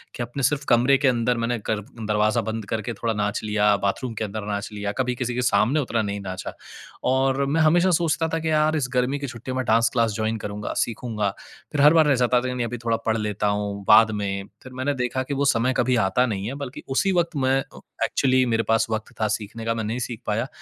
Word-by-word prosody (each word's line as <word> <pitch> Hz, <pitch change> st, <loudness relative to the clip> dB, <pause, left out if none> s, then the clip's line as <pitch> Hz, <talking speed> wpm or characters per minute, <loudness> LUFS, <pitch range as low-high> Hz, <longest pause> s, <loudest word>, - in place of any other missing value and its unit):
कि 120 Hz, -, -3 dB
अपने 125 Hz, +3 st, -5 dB
सिर्फ़ 145 Hz, +1 st, +1 dB
कमरे 125 Hz, +3 st, +5 dB
के 135 Hz, -, +1 dB
अंदर 120 Hz, -1 st, +1 dB
मैंने 115 Hz, +1 st, -1 dB
कर 110 Hz, -1 st, +1 dB
दरवाज़ा 110 Hz, -1 st, 0 dB
बंद 110 Hz, -1 st, -4 dB
करके 115 Hz, +1 st, -2 dB
थोड़ा 115 Hz, +2 st, -2 dB
नाच 105 Hz, -1 st, -1 dB
लिया, 105 Hz, -1 st, +3 dB
बाथरूम 115 Hz, +4 st, -1 dB
के 110 Hz, -, -3 dB
अंदर 105 Hz, 0 st, -5 dB
नाच 100 Hz, +2 st, -3 dB
लिया, 100 Hz, -1 st, -3 dB
कभी 125 Hz, -1 st, -1 dB
किसी 120 Hz, 0 st, -2 dB
के 125 Hz, -, 0 dB
सामने 120 Hz, +5 st, +2 dB
उतना 120 Hz, -4 st, 0 dB
नहीं 100 Hz, -1 st, -3 dB
नाचा। 95 Hz, -1 st, -6 dB, 0.6 s
और 135 Hz, +1 st, +2 dB
मैं 155 Hz, +4 st, +1 dB
हमेशा 175 Hz, +4 st, +4 dB
सोचता 165 Hz, -1 st, +1 dB
था 165 Hz, -, +1 dB
कि 160 Hz, 0 st, -2 dB
यार 155 Hz, +1 st, +3 dB
इस 130 Hz, -4 st, -1 dB
गर्मी 125 Hz, +3 st, +1 dB
की 140 Hz, -, -4 dB
छुट्टियों 120 Hz, +2 st, -6 dB
में 130 Hz, -, 0 dB
डांस 115 Hz, +1 st, +3 dB
क्लास 115 Hz, -3 st, +2 dB
जॉइन 110 Hz, +1 st, -1 dB
करूँगा, 105 Hz, 0 st, -4 dB
सीखूँगा, 110 Hz, -3 st, -3 dB, 0.4 s
फिर 145 Hz, -2 st, 0 dB
हर 150 Hz, +2 st, +7 dB
बार 160 Hz, -2 st, +5 dB
रह 140 Hz, -, +4 dB
जाता 125 Hz, 0 st, +2 dB
था, 130 Hz, -, -3 dB
कि 125 Hz, -, -2 dB
नहीं, 120 Hz, -2 st, -1 dB
अभी 120 Hz, +1 st, -5 dB
थोड़ा 115 Hz, -1 st, +2 dB
पढ़ 110 Hz, 0 st, +1 dB
लेता 105 Hz, -1 st, -1 dB
हूँ, 100 Hz, -1 st, -2 dB
बाद 110 Hz, +1 st, +7 dB
में। 100 Hz, -1 st, -3 dB, 0.2 s
फिर 130 Hz, -, -11 dB
मैंने 130 Hz, +3 st, -1 dB
देखा 130 Hz, +2 st, -1 dB
कि 140 Hz, -, -4 dB
वो 140 Hz, +1 st, 0 dB
समय 125 Hz, +3 st, +1 dB
कभी 125 Hz, +1 st, +2 dB
आता 125 Hz, +7 st, +2 dB
नहीं 100 Hz, -3 st, -3 dB
है 130 Hz, -, -4 dB
बल्कि 140 Hz, -2 st, -7 dB
उसी 190 Hz, +9 st, +1 dB
वक़्त 170 Hz, -2 st, 0 dB
मैं 135 Hz, 0 st, +2 dB, 0.5 s
एक्चुअली 130 Hz, -1 st, +2 dB
मेरे 115 Hz, -1 st, +1 dB
पास 115 Hz, 0 st, +2 dB
वक़्त 110 Hz, 0 st, -4 dB
था 110 Hz, -, +3 dB
सीखने 110 Hz, +1 st, -9 dB
का, 115 Hz, -, +1 dB
मैं 115 Hz, -1 st, -3 dB
नहीं 115 Hz, +4 st, -3 dB
सीख 120 Hz, -2 st, -5 dB
पाया। 115 Hz, +5 st, 0 dB
120 Hz, 240 wpm, -24 LUFS, 110-130 Hz, 0.6 s, हर